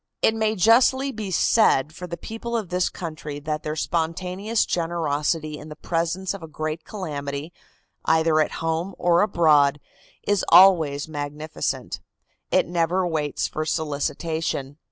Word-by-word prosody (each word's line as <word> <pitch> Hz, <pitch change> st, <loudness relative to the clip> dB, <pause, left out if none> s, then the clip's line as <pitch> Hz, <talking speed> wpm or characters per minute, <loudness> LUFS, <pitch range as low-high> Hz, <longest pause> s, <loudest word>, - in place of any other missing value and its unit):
It 220 Hz, -, +5 dB
may 220 Hz, -1 st, 0 dB
justly 255 Hz, +7 st, +4 dB
be 215 Hz, -5 st, -5 dB
said 160 Hz, -, +3 dB
for 180 Hz, +2 st, -8 dB
the 170 Hz, 0 st, -6 dB
people 230 Hz, +5 st, -4 dB
of 210 Hz, -6 st, -4 dB
this 180 Hz, 0 st, +1 dB
country 155 Hz, -4 st, -6 dB
that 155 Hz, +1 st, -3 dB
their 155 Hz, 0 st, -4 dB
spontaneous 180 Hz, +7 st, -1 dB
generosity 155 Hz, -2 st, -1 dB
in 155 Hz, -, -10 dB
the 150 Hz, -, -8 dB
presence 170 Hz, +4 st, -2 dB
of 200 Hz, -, -8 dB
a 160 Hz, -, -8 dB
great 155 Hz, +1 st, -4 dB
calamity, 145 Hz, -5 st, -5 dB, 0.5 s
either 160 Hz, -1 st, +3 dB
at 155 Hz, -, +1 dB
home 165 Hz, +4 st, -2 dB
or 175 Hz, 0 st, +3 dB
abroad, 150 Hz, -8 st, +4 dB, 0.4 s
is 205 Hz, -2 st, +1 dB
always 165 Hz, -6 st, +6 dB
magnificent. 150 Hz, 0 st, -4 dB, 0.5 s
It -, -, +3 dB
never 175 Hz, +2 st, +1 dB
waits 155 Hz, -4 st, -1 dB
for 155 Hz, -, -3 dB
solicitation. 155 Hz, -1 st, -2 dB
165 Hz, 140 wpm, -24 LUFS, 155-185 Hz, 0.5 s, always